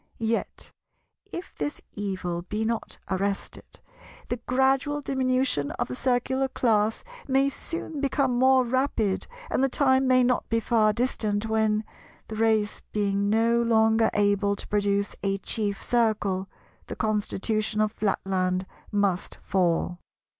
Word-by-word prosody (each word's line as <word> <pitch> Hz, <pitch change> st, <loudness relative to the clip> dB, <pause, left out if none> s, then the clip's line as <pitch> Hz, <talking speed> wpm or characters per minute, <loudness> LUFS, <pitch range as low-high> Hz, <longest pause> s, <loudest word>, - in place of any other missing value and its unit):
Yet, 225 Hz, 0 st, -2 dB, 0.6 s
if 350 Hz, -, -7 dB
this 145 Hz, 0 st, -3 dB
evil 185 Hz, -4 st, -3 dB
be 210 Hz, +5 st, -3 dB
not 230 Hz, 0 st, -3 dB
arrested, 195 Hz, +1 st, -3 dB, 0.5 s
the 245 Hz, -, -1 dB
gradual 270 Hz, +3 st, +2 dB
diminution 255 Hz, -, 0 dB
of -, -, -3 dB
the 125 Hz, -, -4 dB
Circular 260 Hz, -, +1 dB
class 220 Hz, -4 st, +1 dB, 0.2 s
may 270 Hz, 0 st, +3 dB
soon 320 Hz, 0 st, -5 dB
become 275 Hz, -2 st, +1 dB
more 260 Hz, +1 st, +4 dB
rapid, 240 Hz, -5 st, 0 dB, 0.2 s
and 260 Hz, -, +1 dB
the 270 Hz, -, +3 dB
time 265 Hz, 0 st, +3 dB
may 255 Hz, -1 st, +5 dB
not 250 Hz, 0 st, +1 dB
be 230 Hz, -, +2 dB
far 220 Hz, -1 st, +3 dB
distant 215 Hz, -2 st, -1 dB
when, 220 Hz, -1 st, +1 dB, 0.5 s
the 220 Hz, -, -5 dB
race 220 Hz, -1 st, +1 dB
being 200 Hz, -1 st, 0 dB
no 230 Hz, +2 st, +3 dB
longer 225 Hz, -1 st, +3 dB
able 205 Hz, -1 st, +2 dB
to -, -, -6 dB
produce 200 Hz, -1 st, 0 dB
a 195 Hz, 0 st, 0 dB
Chief 205 Hz, 0 st, -2 dB
Circle, 210 Hz, -5 st, +1 dB, 0.4 s
the -, -, -5 dB
Constitution 215 Hz, 0 st, 0 dB
of 215 Hz, 0 st, +2 dB
Flatland 190 Hz, -3 st, -1 dB, 0.3 s
must 200 Hz, -3 st, 0 dB
fall. 175 Hz, -2 st, 0 dB
220 Hz, 130 wpm, -26 LUFS, 200-255 Hz, 0.6 s, may